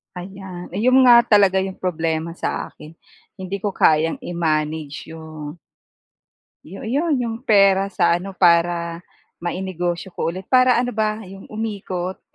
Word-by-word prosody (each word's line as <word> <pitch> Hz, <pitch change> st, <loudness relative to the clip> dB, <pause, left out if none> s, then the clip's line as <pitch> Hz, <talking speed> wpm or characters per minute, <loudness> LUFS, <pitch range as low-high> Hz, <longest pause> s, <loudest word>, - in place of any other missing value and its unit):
Ayan. 185 Hz, -1 st, -8 dB
Ayun 255 Hz, +5 st, +4 dB
nga 240 Hz, -1 st, +8 dB
talaga 200 Hz, -4 st, +4 dB
'yong 190 Hz, -1 st, -6 dB
problema 165 Hz, -1 st, -2 dB
sa -, -, -3 dB
akin. 150 Hz, -, -14 dB, 0.5 s
Hindi 190 Hz, +1 st, -5 dB
ko 205 Hz, -, 0 dB
kayang 160 Hz, -2 st, +2 dB
i-manage 155 Hz, -3 st, -2 dB
yung 155 Hz, -1 st, -9 dB, 1.1 s
Yo 195 Hz, +6 st, -9 dB
'yon 290 Hz, +5 st, 0 dB
'yong 230 Hz, -2 st, -3 dB
pera 195 Hz, -4 st, +4 dB
sa 185 Hz, -, +2 dB
ano, 185 Hz, +2 st, -4 dB
para 170 Hz, -1 st, +2 dB, 0.4 s
mainegosyo 175 Hz, 0 st, -3 dB
ko -, -, -2 dB
ulit 185 Hz, +3 st, -7 dB
para 255 Hz, -1 st, +4 dB
ano 245 Hz, +1 st, -1 dB
ba, 215 Hz, 0 st, 0 dB
yung 195 Hz, +1 st, -12 dB
umikot 195 Hz, -4 st, -4 dB
185 Hz, 135 wpm, -21 LUFS, 170-210 Hz, 1.1 s, nga